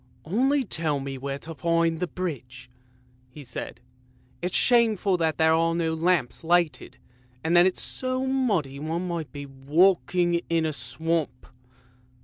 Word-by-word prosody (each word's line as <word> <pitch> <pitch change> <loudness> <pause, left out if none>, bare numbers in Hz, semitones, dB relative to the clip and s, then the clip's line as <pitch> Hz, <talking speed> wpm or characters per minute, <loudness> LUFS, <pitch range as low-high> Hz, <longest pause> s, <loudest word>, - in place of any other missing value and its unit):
" - - -33
Only 265 - +2
tell 160 - -1
me 135 -1 -6
where 135 +1 -4
to 160 +3 -8
find 165 0 +1
the 180 - -1
bridge," 130 -9 -6 0.6
he 145 +3 -11
said. 125 -2 -7 0.3
" 125 0 -34
It's 180 +1 -2
shameful 220 -6 +3
that 160 -2 0
there 160 0 +4
are 165 +1 +2
no 165 -1 0
lamps 165 -4 0
lighted, 165 -5 0 0.5
and 165 +2 +1
then 175 +1 +7
it's 185 - -1
so 255 0 -1
muddy 205 - 0
one 165 +4 -3
might 170 -4 -4
be 145 -1 -7
walking 170 +5 +2
in 165 -1 +1
a 155 - -1
swamp." 145 -1 -2
165 Hz, 155 wpm, -25 LUFS, 140-180 Hz, 0.6 s, then